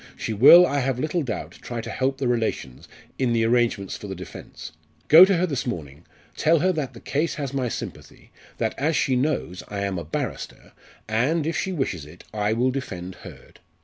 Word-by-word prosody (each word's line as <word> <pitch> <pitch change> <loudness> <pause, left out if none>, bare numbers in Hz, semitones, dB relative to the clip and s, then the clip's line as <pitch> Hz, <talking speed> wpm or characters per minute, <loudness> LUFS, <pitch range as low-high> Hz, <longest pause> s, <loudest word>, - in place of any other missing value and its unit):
She 110 - -3
will, 155 - +9
I 145 -4 0
have 130 -1 -1
little 155 +6 -1
doubt, 125 -7 -5
try 120 -1 -5
to 110 - -6
help 135 +1 -1
the 135 -2 -1
relations 110 - -2 0.3
in 125 -3 +1
the 115 -1 +2
arrangements 115 -5 +1
for 105 - -8
the 95 - -5
defence. 90 0 -10 0.4
Go 165 +4 +10
to 195 -2 +2
her 180 - +2
this 140 -7 -3
morning 75 - -6 0.3
tell 165 +3 +3
her 185 +5 +2
that 140 -7 -4
the - - -10
case 150 +7 -1
has 140 -2 -4
my 130 -3 -1
sympathy - - -8 0.3
that, - - -1
as 155 +3 +1
she 130 - +1
knows, 125 - -1
I 100 -1 -4
am 100 -2 -2
a - - -6
barrister, 80 - -5 0.4
and, 130 +9 +1
if 165 - -1
she 190 - -1
wishes 95 - -3
it, 85 +4 -14
I 105 0 0
will 125 +3 +1
defend 95 -9 -5
Hurd. - - -13
125 Hz, 205 wpm, -24 LUFS, 105-145 Hz, 0.4 s, Go